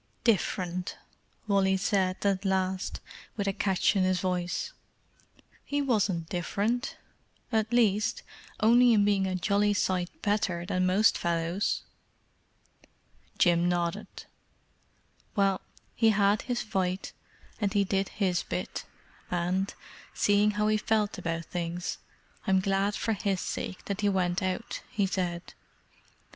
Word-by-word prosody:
"Different!" 185 -4 0 0.5
Wall 195 -2 +3
said, 190 -1 0
at 195 -1 +2
last, 190 -1 -1 0.4
with 200 - -1
a 195 - +1
catch 195 +2 +1
in 195 - +3
his 185 0 +2
voice. 180 -1 -2 0.9
"He 285 - -1
wasn't 200 - +1
different—at 220 +3 -3
least, 215 -3 +2 0.4
only 235 +2 +6
in 205 -2 +4
being 200 -2 +2
a 185 - -1
jolly 205 +3 +2
sight 185 -3 0
better 195 -5 0
than 185 -1 +1
most 200 +4 +4
fellows." 170 +3 0 1.5
Jim 175 -1 +4
nodded. 175 +4 -1 1.3
"Well, 195 -2 +2 0.3
he 225 -1 +4
had 205 0 +3
his 245 -2 -2
fight, 190 -3 -2 0.5
and 205 -3 0
he 205 -2 +3
did 195 0 0
his 185 -4 0
bit, - - -4 0.4
and, 180 +3 0 0.4
seeing 205 +1 +4
how 210 0 +2
he 215 0 +3
felt 215 -1 0
about 165 0 -3
things, 175 0 -4 0.5
I'm 190 -1 +4
glad 195 +2 +1
for 225 - 0
his 200 -2 -1
sake 185 - -4
that 200 +1 -3
he 205 - +3
went 180 -1 +1
out," 185 +5 -3
he 210 -5 +1
said. 180 -2 -3
195 Hz, 125 wpm, -29 LUFS, 180-210 Hz, 1.5 s, only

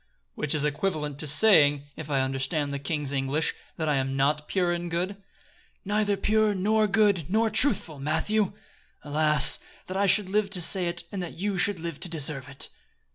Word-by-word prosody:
"Which 150 0 -2
is 150 -1 0
equivalent 150 -2 -2
to 155 - -4
saying, 145 -3 +4
if 155 -2 -8
I 135 -2 +1
understand 135 +2 -2
the 140 - -3
king's 145 -1 -3
English, 140 +3 -1 0.2
that 160 - -2
I 150 -2 +1
am 135 0 -2
not 150 +2 0
pure 180 -2 0
and 175 0 -3
good?" 180 +4 -2 0.7
"Neither 205 0 0
pure, 215 +1 +1
nor 215 +3 +2
good, 200 -5 +2
nor 220 +3 +1
truthful, 210 - +2
Matthew! 185 +9 0 0.5
Alas! 150 0 +4 0.3
that 185 - -5
I 200 0 +2
should 200 +1 +4
live 205 +1 0
to 195 -2 -2
say 180 +1 +2
it, 170 0 -4
and 195 - -4
that 175 - -7
you 200 +2 -2
should 200 -1 +1
live 165 -3 -6
to 180 - -4
deserve 145 -4 0
it." 135 - 0
165 Hz, 185 wpm, -26 LUFS, 145-200 Hz, 0.7 s, saying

